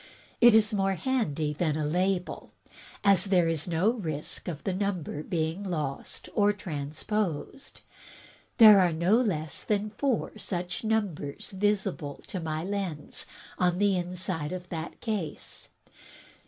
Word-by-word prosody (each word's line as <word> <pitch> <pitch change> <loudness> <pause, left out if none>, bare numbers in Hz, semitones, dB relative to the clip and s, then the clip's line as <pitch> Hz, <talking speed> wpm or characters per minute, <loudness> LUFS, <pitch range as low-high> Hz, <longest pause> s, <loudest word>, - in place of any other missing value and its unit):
It 240 -2 +8
is 220 0 +4
more 195 -1 +1
handy 160 - -1
than 155 -1 0
a 155 - -1
label, 180 +3 -1 0.5
as 195 -2 +6
there 185 -4 +3
is 165 -1 0
no 175 +6 +2
risk 160 -11 -4
of 160 -4 -5
the 190 - -1
number 185 -6 -2
being 160 +2 -2
lost 155 -8 -4
or 205 0 +4
transposed. 175 - -4 0.8
There 215 -3 +10
are 180 -3 +3
no 175 +7 +3
less 160 -10 -2
than 210 0 0
four 235 -2 -1
such 180 -1 -3
numbers 205 -10 -2
visible 195 -7 -1
to 185 - -3
my 160 -1 -3
lens 190 -6 -3 0.3
on 180 -1 +2
the 200 0 +3
inside 180 -3 -3
of 180 -1 -6
this 165 -1 -4
case. 205 -9 -4
180 Hz, 135 wpm, -28 LUFS, 160-205 Hz, 0.8 s, There